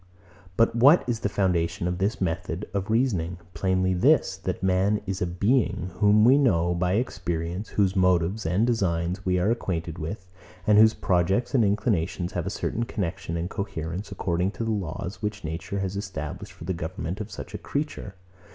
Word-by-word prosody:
But 115 0 +3
what 140 +8 +6
is 120 -3 -1
the 105 - -1
foundation 90 -3 0
of 90 0 -2
this 100 +5 0
method 90 +1 -2
of 100 +1 -2
reasoning? 100 -8 +1 0.2
Plainly 95 -1 +1
this; 90 - +3
that - - -4
man 95 +3 +2
is 95 -1 -3
a 90 - +1
being, 100 0 +1
whom 105 +1 +5
we 135 +4 +6
know 85 -10 +3
by 90 +1 0
experience, 90 -4 -2
whose 100 -2 +1
motives 90 +2 +2
and 90 +7 +2
designs 90 -5 0
we 90 0 +2
are 95 +5 +2
acquainted 85 -7 -3
with, 90 +4 -5 0.4
and 105 0 +5
whose 110 0 +6
projects 95 +7 +1
and 125 -4 +4
inclinations 95 -4 0
have 90 0 -3
a - - 0
certain 115 +3 -2
connexion 85 -5 -3
and 85 +3 -3
coherence, 95 -2 -4
according 90 +1 0
to - - -4
the 115 - -1
laws 90 -2 -4
which 105 -1 -3
nature 80 +5 -4
has 95 0 -3
established 95 -7 -5
for - - -12
the 95 +3 -2
government 85 +3 -4
of 105 - -6
such - - -8
a - - -5
creature. 140 -9 -4
95 Hz, 180 wpm, -26 LUFS, 85-105 Hz, 0.4 s, what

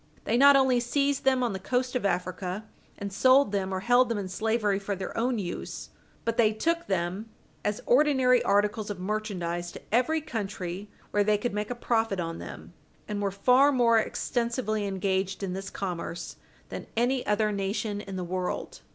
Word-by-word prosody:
They - - 0
not 280 +3 +7
only 265 -2 +4
seized 275 +3 0
them 260 -1 +3
on 235 -4 0
the 190 - -4
coast 250 +5 -1
of 235 -5 +1
Africa 185 +2 -3 0.3
and 200 -1 -5
sold 255 +3 +5
them 195 -2 -1
or 190 0 -2
held 245 +3 +4
them 230 - 0
in 195 -2 -4
slavery 210 0 0
for 200 0 -3
their 190 -1 -6
own 240 +1 0
use, 180 -4 -5 0.3
but 230 0 -1
they 220 -2 +4
took 335 +10 -1
them 190 +3 -2 0.3
as 210 0 -2
ordinary 255 -2 +4
articles 210 +1 +1
of 205 -3 -5
merchandise 180 -4 -3
to - - -9
every 255 +8 +2
country 200 - -5 0.2
where 205 - +3
they 210 0 +3
could 220 +1 -2
make 210 0 -2
a 245 - -3
profit 225 -4 0
on 165 -1 -3
them, - - -9 0.3
and 210 -1 -3
were 200 - +1
far 250 +8 +4
more 235 -4 +4
extensively 235 -2 -1
engaged 195 0 -1
in 185 -2 -2
this 195 +1 -5
commerce 175 -3 -5 0.3
than - - -7
any 245 +2 +2
other 210 0 +2
nation 205 +1 -2
in 195 -2 -7
the 185 - -3
world. 180 +1 -4
210 Hz, 185 wpm, -28 LUFS, 195-245 Hz, 0.3 s, not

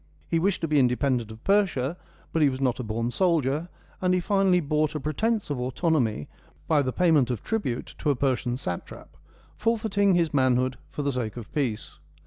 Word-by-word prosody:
He 165 - +1
wished 190 +3 0
to 165 - 0
be 150 -1 +3
independent 125 -2 +1
of 110 0 -11
Persia; 180 -8 +2 0.4
but 165 - +1
he 145 - +5
was 130 0 -4
not 130 -2 0
a - - -2
born 115 +2 -2
soldier, 165 -1 +1 0.3
and 185 0 +2
he - - +2
finally 195 0 +3
bought 155 -1 0
a - - -1
pretence 205 +7 -1
of 140 - -2
autonomy 125 - 0 0.4
by 155 -3 +4
the 130 -2 -1
pay 180 +4 +2
ment 140 -6 +4
of 120 -5 -3
tribute 205 - -3
to 150 - 0
a 145 - +3
Persian 125 -2 0
satrap, 90 -10 -6 0.4
forfeiting 215 -4 +2
his 170 -3 +1
manhood 130 -2 +2
for 145 - -4
the 140 - +1
sake 125 -3 -3
of 115 -3 -9
peace. 115 - -2
145 Hz, 195 wpm, -26 LUFS, 125-175 Hz, 0.4 s, he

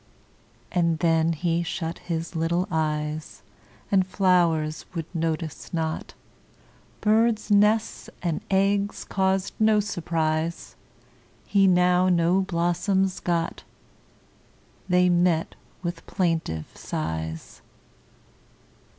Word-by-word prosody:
And 170 -2 +1
then 165 0 +2
he 170 +1 0
shut 170 -1 -4
his 165 0 -4
little 170 +3 0
eyes, 155 -1 -2 0.5
And 195 -2 +4
flowers 170 -5 +2
would 165 -1 -2
notice 165 -1 -3
not; 160 -1 -3 0.9
Birds' 220 0 +2
nests 210 +2 +2
and 170 -3 -1
eggs 200 +1 +1
caused 190 -1 0
no 215 -1 +4
surprise, 165 -4 -2 0.7
He 195 -1 +3
now 180 0 +4
no 175 +2 +3
blossoms 185 +1 0
got; 170 -1 -1 1.3
They 180 0 +4
met 175 -2 +2 0.3
with 175 0 -4
plaintive 165 - -1
sighs. 80 0 -5
175 Hz, 90 wpm, -25 LUFS, 160-190 Hz, 1.3 s, And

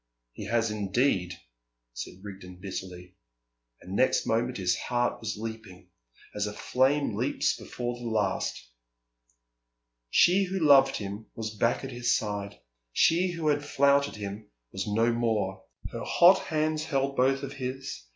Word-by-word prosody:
"He 100 - -8
has 115 0 +1
indeed," 100 -3 0 0.6
said 90 +10 -8
Rigden 95 -3 -9
bitterly; 90 -1 -7 0.7
and 95 +2 -7
next 130 - +3
moment 120 +2 0
his 90 -2 +1
heart 120 +4 -1
was 110 -2 -4
leaping, 105 -5 -8 0.4
as 105 0 -1
a 105 - -5
flame 135 +6 +1
leaps - - 0
before 120 0 -5
the 120 - -5
last. 110 - -1 1.4
She 185 - +5
who 190 +1 -3
loved 140 -5 +6
him 100 +1 -6
was 110 -1 -4
back 115 +5 +1
at 135 - -5
his 120 0 +1
side, 100 -1 -5 0.3
she 175 - +3
who 165 -2 -1
had 145 0 +1
flouted 140 0 +2
him 105 0 -7 0.2
was 95 +1 -4
no 115 +3 +2
more. 105 -5 -1 0.3
Her - - -5
hot 180 +2 +6
hands 155 0 0
held 140 -3 -1
both 135 +1 +2
of 140 0 -5
his. 135 - -5
115 Hz, 145 wpm, -28 LUFS, 100-135 Hz, 1.4 s, loved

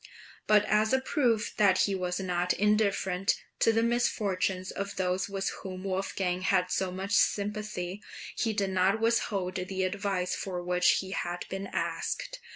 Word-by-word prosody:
But 210 -1 +5
as 215 +2 +2
a 265 - +4
proof 240 -5 +1
that 195 -3 +4
he 200 - +1
was 180 -1 -2
not 180 -1 0
indifferent 200 -2 +2 0.2
to 225 - +5
the 225 0 +2
misfortunes 195 -6 0
of 200 0 -4
those 185 +1 -1
with 195 0 -1
whom 185 -1 -7
Wolfgang 190 -1 -1
had 185 -1 +2
so 190 0 0
much 190 +2 -5
sympathy, 205 -2 0 0.3
he 225 - 0
did 200 -2 -1
not 190 +3 +2
withhold 215 -5 0
the 190 +1 -2
advice 185 -1 -1
for 180 -2 -4
which 180 0 +3
he 190 0 -8
had 175 -2 -3
been 195 +1 -4
asked. - - -3
195 Hz, 160 wpm, -29 LUFS, 185-210 Hz, 0.3 s, But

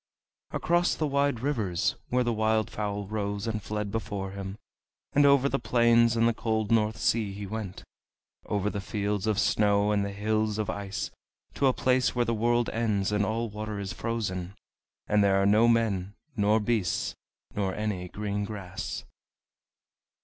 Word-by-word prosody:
Across 175 +1 +1
the 155 - -1
wide 140 -4 +1
rivers, 110 -11 0
where 125 0 +2
the 120 -1 0
wild 110 0 +1
fowl 105 -1 -3
rose 100 0 -3
and 110 -2 -2
fled 105 0 -3
before 105 -3 -3
him, 100 0 -6 0.6
and 145 0 +5
over 140 -1 +5
the 135 - 0
plains 115 0 +4
and 115 0 +4
the 115 - +2
cold 110 -1 -1
North 110 -1 +2
Sea 110 -2 +1
he 100 +1 -6
went, 105 -2 -5 0.6
over 105 0 0
the 100 - -3
fields 105 0 -2
of 110 -2 +1
snow 105 0 +3
and 100 -1 +2
the 100 - -3
hills 110 +1 0
of 110 0 -1
ice, 100 -1 -4 0.4
to 140 - +2
a 130 - +4
place 130 0 +2
where 120 -1 +2
the 115 - 0
world 120 +1 +2
ends, 105 -4 0
and 105 0 +2
all 115 +3 -1
water 105 0 -4
is 100 +2 -4
frozen, 100 -6 -3 0.5
and 105 -1 +3
there 95 -1 +4
are 100 - +2
no 105 +3 +5
men, 105 -4 +1 0.2
nor 105 0 +3
beasts, 105 -5 0 0.4
nor 95 -2 -1
any 105 -4 -2
green 105 +2 -3
grass. 100 -3 -5
105 Hz, 170 wpm, -28 LUFS, 100-115 Hz, 0.6 s, and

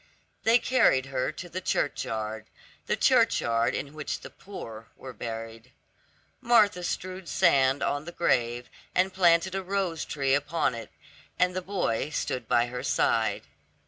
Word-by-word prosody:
They 230 +1 +6
carried 245 - +3
her 130 +1 -2
to 175 - -8
the 180 +2 -5
churchyard, 110 -9 -2 0.4
the - - +1
churchyard 115 +1 +3
in 140 0 -5
which 150 -1 -4
the - - -10
poor 115 - -9
were 130 -1 -9
buried. 115 0 -7 0.7
Martha 210 -5 +4
strewed 185 -1 -4
sand 135 0 +3
on 145 +1 -1
the 175 - -7
grave 120 -7 0 0.3
and 185 +1 +2
planted 180 0 +3
a 195 - -1
rose 185 -4 -2
tree 135 -2 0
upon 145 0 +1
it, 115 -2 -8 0.5
and 180 0 +2
the 185 - -1
boy 175 - -1
stood 125 -5 -3
by 120 - +3
her 125 +1 -5
side. 110 -3 +1
145 Hz, 145 wpm, -27 LUFS, 120-185 Hz, 0.7 s, They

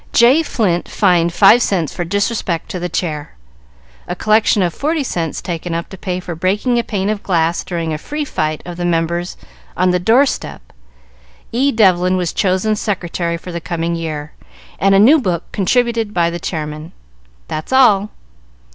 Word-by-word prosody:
J. 250 +7 +5
Flint 195 - -1
fined 175 -4 +2
five 235 +7 +6
cents 175 - 0
for 175 - -3
disrespect 200 -2 -2
to 180 - -4
the 175 0 -3
Chair. 155 - -4 0.7
A 180 - -3
collection 215 0 +3
of 175 -2 -1
forty 305 - -1
cents 165 - -3
taken 170 -1 -4
up 170 - -4
to - - -9
pay 180 0 -3
for 180 -1 -6
breaking 205 +9 0
a - - 0
pane 200 -4 -2
of 210 -1 -1
glass 170 -3 0
during 165 -3 -3
a 155 - -4
free 295 - -4
fight 155 - -2
of 175 -1 -7
the 175 - -3
members 170 +1 -1 0.4
on 185 0 +3
the 180 - +1
door 230 +9 +4
step. - - -6 0.8
E. 270 +4 +2
Devlin 185 -5 +3
was 180 -2 -2
chosen 195 +3 +1
Secretary 175 -4 -2
for 180 +2 -9
the 170 0 -5
coming 170 0 -2
year, 155 -3 -4 0.5
and 195 0 +4
a - - +5
new 275 +9 +6
book 180 -6 -1
contributed 230 +1 0
by 170 -1 +2
the 170 - -5
Chairman." 155 0 -5 0.5
"That's 155 +8 -5
all." 215 -6 +4
180 Hz, 175 wpm, -17 LUFS, 170-215 Hz, 0.8 s, five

